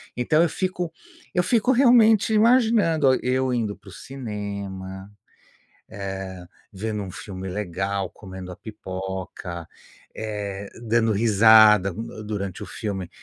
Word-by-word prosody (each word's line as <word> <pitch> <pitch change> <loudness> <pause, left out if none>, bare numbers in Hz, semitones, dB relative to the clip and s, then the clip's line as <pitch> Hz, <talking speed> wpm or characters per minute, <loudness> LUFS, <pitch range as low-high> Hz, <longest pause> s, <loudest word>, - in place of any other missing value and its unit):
Então 155 +6 +2
eu 170 - +2
fico 180 -2 -3 0.4
eu 180 - +2
fico 235 +5 +2
realmente 235 -4 +5
imaginando 215 - +4
a 130 - +3
eu 130 0 +1
indo 110 -4 -1
para 100 - -16
o - - -12
cinema, 100 -6 -6 0.8
eh, 95 -2 -6 0.3
vendo 105 +1 -4
um 95 - -7
filme 95 0 -7
legal, 95 0 -3
comendo 95 -2 -9
a - - -8
pipoca, 95 -4 -7 0.5
eh, 100 -2 -5 0.2
dando 115 0 +3
risada 110 -2 +6 0.3
durante 100 -3 -4
o - - -6
filme 95 -4 -5
105 Hz, 120 wpm, -24 LUFS, 95-130 Hz, 0.8 s, risada